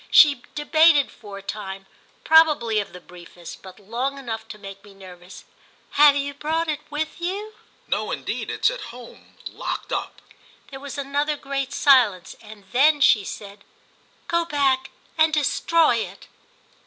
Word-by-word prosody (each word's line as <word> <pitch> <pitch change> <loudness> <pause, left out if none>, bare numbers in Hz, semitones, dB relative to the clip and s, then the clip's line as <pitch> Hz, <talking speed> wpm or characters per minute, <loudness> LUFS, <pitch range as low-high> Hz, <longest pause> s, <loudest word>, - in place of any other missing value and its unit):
She 285 -5 +6
debated 300 -1 +4
for 205 -4 -11
a 200 - -11
time 195 -2 -6 0.4
probably 300 -9 +4
of 205 - -5
the 180 - -11
briefest, 175 -1 -13
but 190 0 -13
long 240 +7 -3
enough 235 -5 -6
to 210 - -9
make 195 -1 -11
me 205 -2 -16
nervous. 180 -1 -13 0.5
"Have 290 0 +6
you 285 0 -2
brought 320 +3 -2
it 305 -1 -2
with 310 +3 -4
you?" 400 +5 -4 0.3
"No - - -2
indeed. - - -4
It's - - +1
at - - -7
home, 240 0 -14
locked - - -5
up." - - -4 0.5
There 270 - -8
was 285 +1 -8
another 285 +2 -1
great 275 -1 -4
silence, 230 -10 +3
and 215 -2 -13
then 290 +5 +4
she 215 -6 +5
said 200 +1 -9 0.6
"Go 340 0 +1
back 275 -4 0 0.3
and 315 0 +5
destroy 310 -1 +2
it." 225 - -6
270 Hz, 155 wpm, -23 LUFS, 205-300 Hz, 0.6 s, She